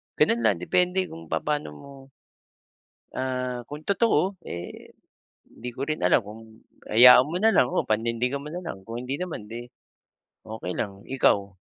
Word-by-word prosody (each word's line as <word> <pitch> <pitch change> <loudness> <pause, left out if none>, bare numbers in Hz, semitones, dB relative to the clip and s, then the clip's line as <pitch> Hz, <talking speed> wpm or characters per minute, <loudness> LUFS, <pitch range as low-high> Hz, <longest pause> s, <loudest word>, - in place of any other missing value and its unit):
gano'n 120 - +3
lang, 105 - +3
depende 180 - +2
kung 165 +1 -10
papaano 150 - -2
mo, 140 - -13 1.2
ah, 125 -1 -3
kung 150 +1 -8
totoo, 200 -3 +2
eh, 85 0 -8 0.6
hindi 125 +1 -8
ko 135 - -5
rin 155 0 -2
alam - - +4
kung 110 +2 -13 0.2
hayaan 125 +3 +8
mo 165 - -4
na 225 - +6
lang 185 - +4
o - - +1
panindigan 115 +5 0
mo - - -10
na 180 - -5
lang. 95 - -8
Kung 115 +2 -5
hindi 135 +3 -4
naman, 160 -13 -6
di 120 +1 -7 0.8
okey 110 -5 -6
lang, 100 -2 -4
ikaw? 110 -6 +2
125 Hz, 160 wpm, -25 LUFS, 110-155 Hz, 1.2 s, hayaan